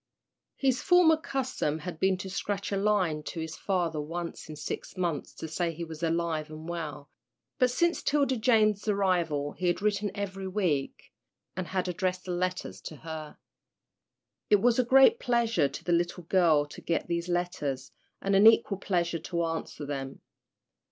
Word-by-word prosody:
His 260 Hz, -2 st, +1 dB
former 355 Hz, -3 st, +6 dB
custom 260 Hz, -, -2 dB
had 160 Hz, +1 st, -7 dB
been 190 Hz, +1 st, +2 dB
to 190 Hz, -, -6 dB
scratch 200 Hz, +2 st, -3 dB
a -, -, +1 dB
line 195 Hz, -6 st, +1 dB
to 165 Hz, +2 st, -6 dB
his 160 Hz, 0 st, -5 dB
father 170 Hz, -5 st, -1 dB
once 170 Hz, +2 st, -6 dB
in 155 Hz, -, -6 dB
six 150 Hz, +5 st, -6 dB
months 170 Hz, -6 st, -2 dB
to 160 Hz, -, -6 dB
say 170 Hz, +2 st, -1 dB
he 165 Hz, +1 st, -6 dB
was 160 Hz, -1 st, -8 dB
alive 165 Hz, -2 st, -1 dB
and 155 Hz, +1 st, -9 dB
well, 150 Hz, -4 st, -5 dB, 0.5 s
but 255 Hz, -, +4 dB
since 340 Hz, +7 st, +1 dB
'Tilda 280 Hz, -3 st, +2 dB
Jane's 215 Hz, -3 st, +3 dB
arrival 175 Hz, -8 st, +1 dB
he 180 Hz, -, -3 dB
had 175 Hz, -, +1 dB
written 205 Hz, 0 st, 0 dB
every 195 Hz, -1 st, -4 dB
week, 180 Hz, -8 st, -2 dB, 0.4 s
and 185 Hz, -1 st, -3 dB
had 185 Hz, -1 st, -1 dB
addressed 180 Hz, 0 st, -1 dB
his -, -, -8 dB
letters 180 Hz, +1 st, -3 dB
to 155 Hz, -, -8 dB
her. 155 Hz, 0 st, -8 dB, 1.1 s
It 205 Hz, -, +6 dB
was 240 Hz, +3 st, +3 dB
a -, -, +5 dB
great 270 Hz, -, +6 dB
pleasure 230 Hz, -, +2 dB
to -, -, -8 dB
the 175 Hz, -, +1 dB
little 175 Hz, +1 st, 0 dB
girl 165 Hz, -4 st, +3 dB
to 145 Hz, -, -11 dB
get 165 Hz, -, -1 dB
these 170 Hz, +1 st, -2 dB
letters, 150 Hz, -7 st, -2 dB, 0.3 s
and 195 Hz, 0 st, +2 dB
an 200 Hz, +3 st, +7 dB
equal 225 Hz, -3 st, +4 dB
pleasure 170 Hz, -4 st, 0 dB
to 170 Hz, +1 st, -2 dB
answer 165 Hz, -2 st, -4 dB
them. 135 Hz, -1 st, -5 dB
180 Hz, 170 wpm, -29 LUFS, 160-205 Hz, 1.1 s, an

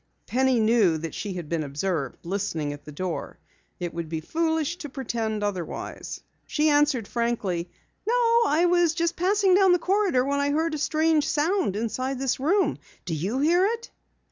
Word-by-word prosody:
Penny 260 Hz, 0 st, +2 dB
knew 215 Hz, -7 st, +3 dB
that 160 Hz, +1 st, -5 dB
she 205 Hz, -3 st, -4 dB
had 175 Hz, -4 st, -6 dB
been 165 Hz, 0 st, -1 dB
observed 145 Hz, -1 st, -2 dB
listening 170 Hz, -6 st, -2 dB
at 145 Hz, -, -12 dB
the 150 Hz, -, -9 dB
door. 175 Hz, +3 st, -4 dB, 0.4 s
It 175 Hz, -1 st, -4 dB
would 165 Hz, -1 st, -5 dB
be 160 Hz, -1 st, -2 dB
foolish 320 Hz, -, -1 dB
to 295 Hz, -, -7 dB
pretend 225 Hz, -5 st, -3 dB
otherwise. 190 Hz, -5 st, -4 dB, 0.3 s
She 310 Hz, +1 st, +2 dB
answered 290 Hz, -7 st, +2 dB
frankly: 210 Hz, -8 st, -1 dB, 0.4 s
"No, 470 Hz, 0 st, +3 dB
I 315 Hz, +4 st, +3 dB
was 345 Hz, -2 st, +3 dB, 0.2 s
passing 380 Hz, +2 st, +3 dB
through 380 Hz, -1 st, +5 dB
the -, -, +5 dB
corridor 360 Hz, -8 st, +1 dB
when 280 Hz, +1 st, 0 dB
I 285 Hz, 0 st, +1 dB
heard 320 Hz, +2 st, 0 dB
a 305 Hz, -, -2 dB
strange 315 Hz, 0 st, +2 dB
sound 325 Hz, -, +1 dB
in 220 Hz, +3 st, -1 dB, 0.3 s
this 265 Hz, 0 st, -1 dB
room. 370 Hz, +9 st, +1 dB, 0.3 s
Do 175 Hz, -, -3 dB
you 195 Hz, -, -1 dB
hear 345 Hz, +5 st, +4 dB
it?" 460 Hz, +3 st, -1 dB
265 Hz, 170 wpm, -25 LUFS, -, 0.4 s, through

